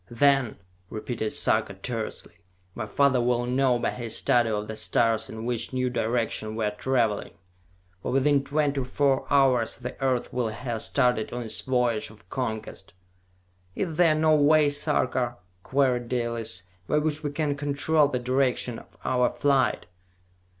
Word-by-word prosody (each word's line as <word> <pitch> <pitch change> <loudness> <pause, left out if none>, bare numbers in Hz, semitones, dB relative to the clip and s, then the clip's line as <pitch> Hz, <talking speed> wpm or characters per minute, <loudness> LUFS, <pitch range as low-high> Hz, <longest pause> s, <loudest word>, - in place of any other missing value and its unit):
"Then," 135 0 +2 0.3
repeated 110 0 -3
Sarka - - +1
tersely, - - -6 0.4
"my 110 +1 -5
father 135 0 +3
will 120 0 +1
know 125 0 +2
by - - -1
his 115 -2 -3
study 120 -2 +2
of 105 -1 -2
the 110 - -5
stars 110 +1 +1
in 110 +1 -7
which 120 +1 -2
new 125 -1 0
direction 115 -2 -1
we 110 -1 -1
are 105 - 0
traveling! 115 -1 -1 0.7
For - - -3
within 135 +1 +3
twenty 145 -1 0
four 135 +1 +1
hours 130 -5 +3
the 125 0 -6
Earth 130 -2 0
will 125 -2 0
have 115 +1 -4
started 125 -3 +1
on 120 0 -4
its 110 - -1
voyage 125 -4 0
of 105 -4 -18
conquest!" 110 -7 -4 0.8
"Is 165 -5 -2
there 165 -3 +5
no 155 0 +4
way, 150 0 +5
Sarka," 130 -4 0 0.2
queried 125 -1 +1
Dalis, 115 -6 -2 0.2
"by 150 - +1
which 150 0 -1
we 150 - -2
can 145 0 -1
control 145 +1 +2
the 130 - -2
direction 125 -1 0
of - - -19
our 125 -1 +2
flight!" 135 +2 +1
125 Hz, 155 wpm, -26 LUFS, 115-140 Hz, 0.8 s, there